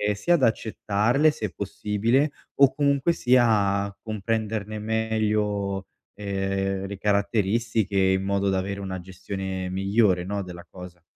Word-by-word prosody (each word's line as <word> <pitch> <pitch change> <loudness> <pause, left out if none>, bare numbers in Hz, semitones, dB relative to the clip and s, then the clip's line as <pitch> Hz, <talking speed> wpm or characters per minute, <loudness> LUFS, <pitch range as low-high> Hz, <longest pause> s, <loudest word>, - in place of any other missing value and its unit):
sia 175 - +1
ad 150 - 0
accettarle 115 +4 +2
se 105 -9 -4
possibile, 105 - 0 0.2
o 140 -1 +5
comunque 140 +2 +2
sia, 110 -8 +3
a 100 0 -9
comprenderne 110 0 -3
meglio, 105 -3 -1 0.3
ehm, 95 -1 -2
le 100 0 -6
caratteristiche 105 +1 0
in 95 0 +3
modo 100 0 0
da 95 - +1
avere 100 +1 -4
una 95 -1 -4
gestione 95 +1 -5
migliore, 95 0 +2
no, 100 +1 -2
della 90 -1 -10
cosa. 90 -1 -11
100 Hz, 130 wpm, -25 LUFS, 95-110 Hz, 0.3 s, o